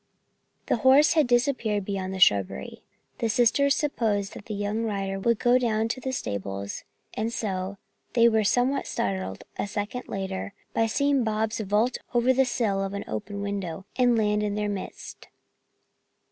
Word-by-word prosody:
The - - +1
horse 265 +5 +6
had 310 -5 +3
disappeared 240 -5 +1
beyond 190 -2 -3
the 190 - -5
shrubbery. 100 - +2 0.4
The 230 - 0
sisters 250 +5 +3
supposed 215 -9 -1
that - - -11
the 215 - -4
young 205 +2 -1
rider 195 -3 -2
would 235 +3 +2
go 245 +3 +4
down 225 -2 0
to 255 - -3
the 260 - -2
stables 100 - -4 0.3
and 220 +1 -2
so 195 -3 -3 0.4
they 235 -1 +6
were 220 -2 +3
somewhat 245 +6 +1
startled, 95 -1 -3 0.2
a - - -1
second 210 +4 -4
later, 195 0 -4 0.2
by 225 - +2
seeing 280 +2 +2
Bobs 220 0 -1
vault 215 +4 +1 0.2
over 240 +2 +4
the 265 +1 +3
sill 220 -6 0
of 195 +1 -4
an 200 - -4
open 205 -1 -5
window 195 -3 -4
and 245 -2 +3
land 210 -1 +2
in 205 -1 -1
their 210 0 -1
midst. 200 -2 -7
215 Hz, 165 wpm, -26 LUFS, 195-240 Hz, 0.4 s, horse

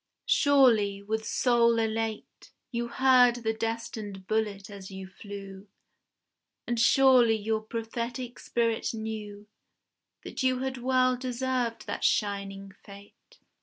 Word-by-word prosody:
Surely 230 -9 +4
with 220 +2 -2
soul 235 -2 +3
elate, 225 -1 -3 0.2
You 235 -1 -2
heard 250 0 +5
the 225 -2 -2
destined 220 -3 -5
bullet 210 -2 -2
as 200 -2 -10
you 190 -1 -8
flew, 195 0 -10 1.0
And 240 -1 -2
surely 245 -1 +5
your 220 +1 -1
prophetic 235 +2 -5
spirit 230 -1 -1
knew 210 -2 -6 0.8
That - - -6
you 260 -1 +2
had 265 0 -3
well 255 0 +2
deserved 250 -1 -2
that - - -5
shining 200 -2 -1
fate. 200 0 -16
225 Hz, 115 wpm, -28 LUFS, 205-245 Hz, 1.0 s, heard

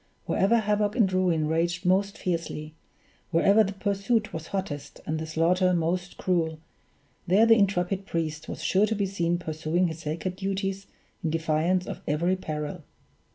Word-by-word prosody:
Wherever 220 +5 +3
havoc 210 -1 +1
and 205 -7 +3
ruin 175 -4 +2
raged 170 +3 0
most 195 +2 +2
fiercely, 165 -3 -3 0.6
wherever 200 +6 +5
the 200 -1 -3
pursuit 200 +3 0
was 160 0 -5
hottest 145 -7 -5
and 155 +1 -2
the 160 - -4
slaughter 180 +3 +2
most 175 +2 -1
cruel, 165 -4 0 0.7
there 195 +6 +5
the 230 - +7
intrepid 195 -2 +1
priest 155 -2 -3
was - - -6
sure 200 +3 +3
to 220 - -1
be 200 -1 0
seen 175 -3 0
pursuing 165 +1 -1
his 160 0 -7
sacred 165 +4 -4
duties 195 0 -3 0.4
in 165 - 0
defiance 165 +3 +1
of - - -6
every 170 +5 +1
peril. 155 -1 -5
180 Hz, 155 wpm, -27 LUFS, 160-195 Hz, 0.7 s, the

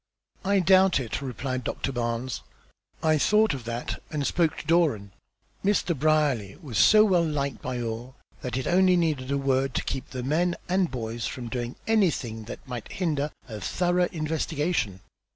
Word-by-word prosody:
"I 200 0 +3
doubt 190 -1 +5
it," 120 +1 -3
replied 130 0 -3
Doctor 135 - -2
Barnes. 120 -1 -2 0.6
"I 155 -1 +3
thought 215 +7 +4
of 130 -4 -6
that, 120 +1 -4
and 150 -3 -2
spoke 165 0 +1
to - - -7
Doran. 150 - +2 0.5
Mr. 195 -4 +2
Brierly 145 -8 +1
was 140 - -3
so 215 0 +7
well 180 -5 +3
liked 140 -4 -2
by 125 -1 -3
all 120 +3 -5 0.3
that 125 0 -3
it 130 - -2
only 185 0 +4
needed 150 -6 0
a 140 - +1
word 135 -1 +1
to - - 0
keep 135 +2 -4
the 130 -2 -5
men 170 +6 +1
and 185 -1 +2
boys 115 -2 -4
from 120 -2 -6
doing 120 0 -3
anything 150 - +1
that 120 - -9
might 120 -3 -6
hinder 150 -5 -1 0.2
a 110 -4 -7
thorough 175 - +1
investigation. 155 - -1
140 Hz, 170 wpm, -26 LUFS, 125-175 Hz, 0.6 s, so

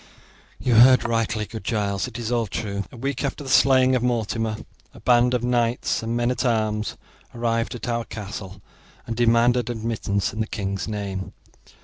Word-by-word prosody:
"You 125 - 0
heard 125 +3 +7
rightly, 115 -2 0
good 110 0 -8
Giles, 100 -3 -1
it - - -8
is 120 -1 -4
all 120 -2 +1
true. 100 -2 -3
A - - -11
week 135 +2 -3
after 140 +1 -3
the 135 - -5
slaying 130 +1 +5
of 125 - +1
Mortimer 115 -2 -1 0.4
a - - -12
band 125 0 +3
of 120 - -1
knights 120 -1 +1
and 115 +1 -2
men 120 +1 +1
at 125 - -2
arms 110 -3 0 0.4
arrived 115 0 -1
at 120 - -6
our 115 -1 -1
castle 100 -2 -8 0.4
and 115 - -4
demanded 120 +1 +3
admittance 110 -4 -2
in 110 - -6
the 110 - 0
king's 100 -3 -3
name. 100 -3 -4
115 Hz, 175 wpm, -23 LUFS, 105-120 Hz, 0.4 s, heard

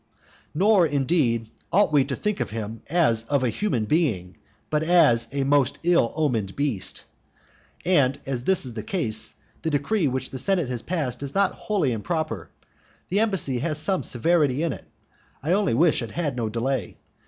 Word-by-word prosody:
Nor, 190 0 +4
indeed, 135 -6 0 0.2
ought 195 -4 +3
we 140 -2 +5
to 135 - -3
think 210 +5 -2
of - - -2
him 110 0 -5
as 145 -10 +2
of 140 +1 +1
a 125 - +2
human 120 - -1
being, 105 - 0 0.4
but 150 0 +2
as 155 -9 +4
of 140 - -13
a 140 - +1
most 140 -1 +2
ill 170 -9 +3
omened 120 -11 -1
beast. 140 -10 -2 0.8
And 140 -7 +3
as 130 -2 -3
this 190 -6 +2
is 125 - -6
the 110 - -4
case, 110 - -3 0.3
the 160 - -1
decree 150 +5 +1
which 130 0 -2
the 130 - -4
senate 175 -1 +1
has 125 -2 -3
passed 140 -8 -3
is 140 -1 -6
not 200 -1 +2
wholly 195 -11 -1
improper. 150 - -3 0.6
The 195 - +1
embassy 195 - +1
has 155 +2 -1
some 185 +4 0
severity 150 +1 +1
in 165 - 0
it; - - -11 0.6
I 155 - 0
only 195 - +2
wish 160 +2 +3
it 115 - -5
had 150 0 -2
no 115 -3 -2
delay. 120 -1 -2
140 Hz, 180 wpm, -24 LUFS, 120-170 Hz, 0.8 s, we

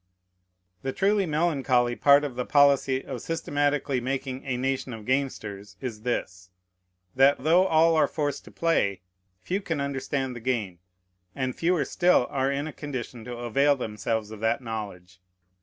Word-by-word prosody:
The 135 - -3
truly 200 -1 +2
melancholy 135 -6 +1
part 140 +2 +5
of 140 -4 -4
the 125 - -1
policy 140 -1 +3
of 130 -4 -6
systematically 145 -4 -1
making 130 +1 -3
a 125 -2 -1
nation 130 0 -2
of 110 -2 -9
gamesters 105 -7 -2
is 115 -5 -6
this, 90 -6 -3 0.7
that, 135 0 +4
though 175 +5 +4
all 165 0 +4
are 155 - +4
forced 145 -3 -3
to - - -13
play, 100 - 0 0.4
few 190 - -2
can 165 -6 -3
understand 135 -1 -2
the - - -6
game, 110 -8 -2 0.6
and 130 -2 -2
fewer 170 -1 +1
still 180 -8 +3
are 135 0 0
in 140 +1 -2
a 155 - -6
condition 125 -5 -6
to 120 -1 -6
avail 140 +5 +2
themselves 110 -2 -3
of 110 - -8
that 110 +4 +1
knowledge. 100 -6 -7
130 Hz, 155 wpm, -26 LUFS, 120-145 Hz, 0.7 s, part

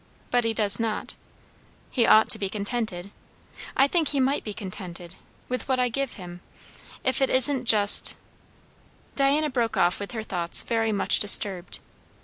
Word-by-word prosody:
But 245 -1 0
he 225 - -1
does 205 -1 +4
not. 225 -2 -4 0.8
He 240 -3 0
ought 220 0 +4
to 220 - +6
be 195 -2 -4
contented 200 -3 -5 0.7
I 270 - +4
think 325 0 -1
he 280 - -2
might 270 +2 -1
be 215 - -7
contented 185 -4 -8 0.3
with 250 +2 -6
what 260 -1 0
I 250 -1 0
give 275 +2 -4
him, 175 -2 -12 0.6
if 260 +1 -2
it 270 - +1
isn't 260 0 +4
just" 205 -3 +6 1.0
Diana 285 +2 +1
broke 235 -3 -3
off 175 +1 0
with 200 +3 -8
her 220 -2 -6
thoughts 175 -5 -1
very 225 -1 -2
much 200 -2 0
disturbed. 195 -3 +2
225 Hz, 160 wpm, -23 LUFS, 200-260 Hz, 1.0 s, to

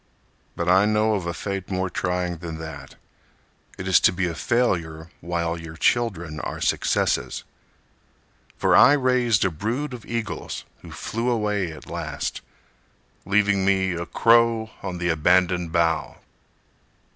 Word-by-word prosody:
But 85 - -3
I 95 +3 +5
know 110 +1 +2
of 95 -5 -2
a 85 - -2
fate 100 -1 -4
more 95 -1 -1
trying 90 -1 -2
than 80 -1 -6
that: 80 -4 -9 0.8
It 95 - -6
is 95 - +6
to - - +4
be 90 0 -1
a 85 - -2
failure 85 - -1
while 85 -1 -2
your 80 0 -9
children 85 -9 0
are - - -5
successes. - - 0 1.1
For - - +3
I 145 - +8
raised 125 -6 +2
a 95 - +1
brood 120 - -3
of 120 - -8
eagles 115 -2 -4 0.2
Who - - -11
flew 115 +3 -3
away 105 -6 0
at 80 - -11
last, - - -4 0.9
leaving 100 -1 +2
me 95 -1 +2
A 85 0 -4
crow 115 -1 +3
on 95 -2 -4
the 85 0 -1
abandoned 90 +2 +2
bough. 80 -1 0
95 Hz, 145 wpm, -24 LUFS, 85-110 Hz, 1.1 s, I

